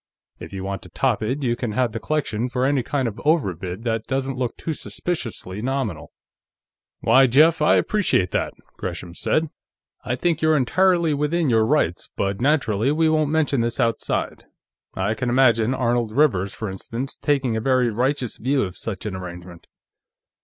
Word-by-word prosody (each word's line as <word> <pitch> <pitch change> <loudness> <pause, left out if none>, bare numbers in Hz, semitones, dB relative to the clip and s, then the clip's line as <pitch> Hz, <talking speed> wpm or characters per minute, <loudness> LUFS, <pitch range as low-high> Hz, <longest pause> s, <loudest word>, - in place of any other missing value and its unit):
If - - -9
you 95 -1 -5
want 100 0 -4
to 90 - -13
top 125 0 0
it, 130 +7 -2
you 120 -2 +1
can 120 -3 -3
have 125 +1 +1
the 115 - -4
collection 125 -5 -1
for 125 +1 0
any 140 -1 +2
kind 130 +1 -1
of 110 - -5
an - - -9
overbid 95 - 0
that 115 -2 -2
doesn't 135 0 -1
look 125 -2 -3
too 160 - -3
suspiciously 115 - -4
nominal." 120 - -3 0.9
"Why, 130 +4 +5
Jeff, 155 +6 +4
I 150 - +5
appreciate 185 - +1
that," - - -1 0.2
Gresham 85 -1 -5
said. 155 - 0 0.5
"I 125 - -1
think 165 +4 0
you're 155 -1 +4
entirely 170 +4 +3
within 150 +1 +1
your 110 -1 +3
rights, 125 - 0
but 100 +2 -2
naturally, 130 -4 +2
we 160 +1 +2
won't 155 -2 +2
mention 150 -5 +1
this 115 +2 -2
outside. 115 -2 -1 0.5
I 100 +3 0
can 125 +1 -2
imagine 120 -1 +3
Arnold 120 -3 0
Rivers, 105 -9 +2
for 110 - -5
instance, 115 +7 -5
taking 135 -5 0
a 110 - -1
very 130 -1 +2
righteous 125 +2 -1
view 135 +3 +1
of 90 -2 -5
such 105 -4 -5
an 105 -3 -3
arrangement." 90 -2 -9
125 Hz, 175 wpm, -22 LUFS, 110-145 Hz, 0.9 s, Why